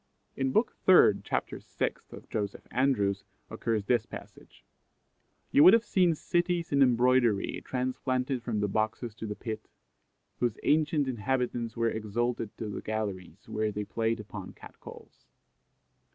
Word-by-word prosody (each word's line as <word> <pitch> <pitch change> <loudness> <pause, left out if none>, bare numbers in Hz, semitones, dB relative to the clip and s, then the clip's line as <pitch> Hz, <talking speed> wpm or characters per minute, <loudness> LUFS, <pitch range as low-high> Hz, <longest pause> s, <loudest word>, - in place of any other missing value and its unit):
In 135 -1 0
book 220 - +1
iii. 105 - +7
chap. - - -1
vi. - - -6 0.5
of - - -12
Joseph 100 -2 -4
Andrews, 105 -7 +1 0.3
occurs 110 -3 -1
this 120 0 +1
passage: - - -12 0.9
"You 145 - +6
would 185 - +9
have 230 - +2
seen 180 -4 +3
cities 175 +1 -1
in 140 -1 +3
embroidery 125 -4 +3
transplanted 130 0 -2
from 115 -3 -2
the 105 - +1
boxes 110 +3 -2
to 110 +1 -7
the 105 - -4
pit, 110 +1 -6 0.7
whose 120 -3 0
ancient 150 -1 +2
inhabitants 120 -1 -2
were 115 -1 +1
exalted 115 +1 -2
to 110 - -4
the 105 - -5
galleries, 100 -4 -5
where 110 0 -1
they 105 0 -3
played 115 +2 -1
upon 105 -2 -8
cat - - -14
calls." - - -14
115 Hz, 145 wpm, -29 LUFS, 105-130 Hz, 0.9 s, would